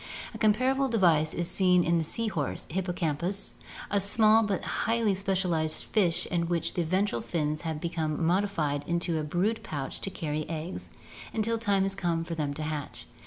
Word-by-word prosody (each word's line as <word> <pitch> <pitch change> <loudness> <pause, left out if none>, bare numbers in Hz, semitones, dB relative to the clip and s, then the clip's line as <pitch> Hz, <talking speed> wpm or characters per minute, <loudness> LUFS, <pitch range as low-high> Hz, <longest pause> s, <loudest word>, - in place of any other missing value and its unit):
A - - -8
comparable 255 +6 +3
device 170 -9 +3
is 175 -1 -2
seen 180 -2 +3
in 170 0 +2
the - - 0
sea 230 +8 -3
horse 150 -10 -2
(Hippocampus, 175 +1 -1
Fig. - - -21
13), - - -10
a 200 - +3
small 215 +2 +5
but 205 -4 -1
highly 225 -2 +1
specialized 185 -5 0
fish 180 -6 +1
in 170 -2 -1
which 170 -1 -1
the 175 - 0
ventral 185 - 0
fins 155 -2 -2
have 160 -2 -3
been 160 -2 -2
modified 165 -6 +1
into 170 -1 0
a - - -2
brood 185 +9 0
pouch 140 -3 -5
to - - -3
carry 155 -5 -3
the 155 - -5
eggs 165 +2 -5 0.5
until 225 +1 +1
time 200 -3 +2 0.4
for 165 - -5
them 150 -3 -1
to 155 - -4
hatch. 150 -2 -4
175 Hz, 180 wpm, -29 LUFS, 155-200 Hz, 0.5 s, small